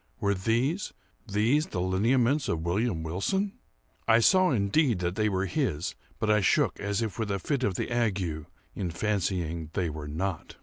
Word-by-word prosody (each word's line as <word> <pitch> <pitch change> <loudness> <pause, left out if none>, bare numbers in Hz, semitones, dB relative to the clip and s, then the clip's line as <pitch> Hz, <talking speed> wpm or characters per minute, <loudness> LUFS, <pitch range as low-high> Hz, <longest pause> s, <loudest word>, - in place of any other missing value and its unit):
Were 100 0 +2
these—these 120 - -1
the 90 - -4
lineaments 115 +10 +2
of 80 -1 -1
William 90 -1 0
Wilson? 190 - -1 0.5
I 115 -1 +6
saw, 185 - +5
indeed, 120 - +2
that 90 0 -1
they 110 +2 +1
were 95 -1 0
his, 95 - -1 0.2
but 110 - -1
I 105 0 +4
shook 95 - +2
as 100 +3 -1
if 110 +1 -4
with 110 -2 -1
a 100 - 0
fit 135 +5 -2
of 100 -6 +1
the - - -3
ague 95 -10 -1 0.3
in 90 - -3
fancying 85 -4 -1
they 85 -4 -1
were 75 -1 -6
not. 80 +3 -4
100 Hz, 170 wpm, -28 LUFS, 90-120 Hz, 0.5 s, I